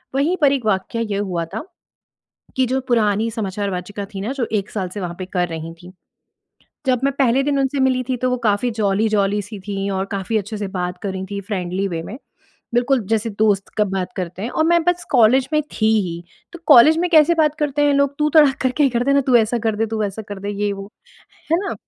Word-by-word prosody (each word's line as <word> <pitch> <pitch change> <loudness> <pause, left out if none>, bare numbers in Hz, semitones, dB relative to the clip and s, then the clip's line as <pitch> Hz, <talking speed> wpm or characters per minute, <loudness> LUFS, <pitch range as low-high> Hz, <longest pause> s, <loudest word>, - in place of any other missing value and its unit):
वहीं 300 +7 +2
पर 285 -2 +5
एक 265 -5 -2
वाक़या 215 +2 -1
ये 210 -3 -2
हुआ 180 -5 -2
था, 165 - -6 0.9
कि 260 - +2
जो 260 +2 0
पुरानी 220 -2 +2
समाचार-वाचिका 200 -2 -4
थी 195 - -4
ना, 225 +7 -3
जो 255 -5 -2
1 205 -2 -1
साल 190 -4 -3
से 200 +3 -7
वहाँ 175 -2 -4
पे 185 - -4
कर 180 -2 0
रही 165 0 -6
थी, 175 +2 -14 0.9
जब 255 -2 +2
मैं 275 - +2
पहले 265 0 +3
दिन 280 0 0
उनसे 270 +1 0
मिली 260 -1 +2
थी 255 - 0
तो 255 +1 -1
वो 250 - +1
काफ़ी 210 +4 +1
जॉली-जॉली 210 -1 +1
सी 205 +1 -9
थीं 200 -1 -3
और 190 0 -1
काफ़ी 200 +3 -2
अच्छे 210 +1 -5
से 205 - -3
बात 180 0 -3
कर 200 - -2
रही 190 0 -5
थीं 200 0 -3
फ्रेंडली 190 0 -2
वे 165 -3 -4
में, 205 - -8 0.6
बिल्कुल 250 +2 +2
जैसे 225 0 0
दोस्त 205 -3 +2
का 210 - +4
बात 190 -2 -2
करते 180 0 -5
हैं 230 - -3
और 315 - +1
मैं 340 0 +3
बस 355 0 0
कॉलेज 255 +2 +4
में 305 - +3
थी 215 - 0 0.2
ही, 170 0 -6 0.3
तो 345 - -9
कॉलेज 300 +3 +7
में 355 +1 +1
कैसे 320 +1 +6
बात 305 -2 +2
करते 290 -1 0
हैं 290 -1 +3
लोग 280 0 +1
तू 300 0 +2
तड़ाक 295 -3 +5
करके 260 +3 +1
ही 275 - +3
करते 245 +3 +1
ना 280 - +4
तू 255 -2 +3
ऐसा 230 +1 +2
कर 220 -1 -1
दे, 225 +1 0
तू 220 0 -3
वैसा 210 +1 -3
कर 205 -1 -6
दे, 200 +1 -4
ये 205 0 -1
वो। 195 +1 -8 0.6
है 330 - +5
ना? 400 - -3
220 Hz, 235 wpm, -20 LUFS, 195-265 Hz, 0.9 s, कॉलेज